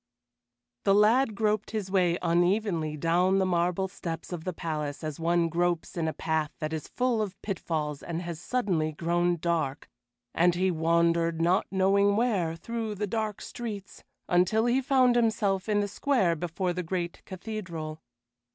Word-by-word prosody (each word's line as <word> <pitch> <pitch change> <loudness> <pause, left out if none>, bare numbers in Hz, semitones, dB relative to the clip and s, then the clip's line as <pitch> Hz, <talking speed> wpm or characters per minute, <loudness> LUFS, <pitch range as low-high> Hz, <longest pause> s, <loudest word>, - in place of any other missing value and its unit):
The 195 - +4
lad 220 +3 +4
groped 215 -1 0
his 210 -4 -4
way 180 -3 +3
unevenly 175 -2 +1
down 175 +5 +2
the 190 - +2
marble 180 +1 +1
steps 170 -2 -6
of 165 -2 -6
the 185 - -1
palace 150 -4 -4
as 155 -1 -4
one 170 +1 +2
gropes 170 0 -1
in 165 -2 -1
a - - 0
path 160 -2 -1
that 155 +1 -4
is 155 -2 -4
full 245 -3 0
of 200 -2 -4
pitfalls 155 -7 -3
and 170 +1 -4
has 170 -1 -6
suddenly 175 -12 0
grown 175 +2 +1
dark, 160 -4 -1 0.5
and 175 +1 +3
he 185 +1 +2
wandered, 170 0 +2
not 175 +3 +2
knowing 200 +1 +3
where, 200 -8 +1
through 225 +4 -4
the 210 +1 -2
dark 215 0 -3
streets, 210 -5 -7 0.2
until 185 +6 +3
he 245 +2 +2
found 255 -2 +4
himself 215 -4 +1
in 205 -1 +3
the 205 - -1
square 205 - +1
before 175 +2 -2
the 180 - -2
great 175 0 -3
cathedral. 175 -6 -6
180 Hz, 160 wpm, -28 LUFS, 165-205 Hz, 0.5 s, The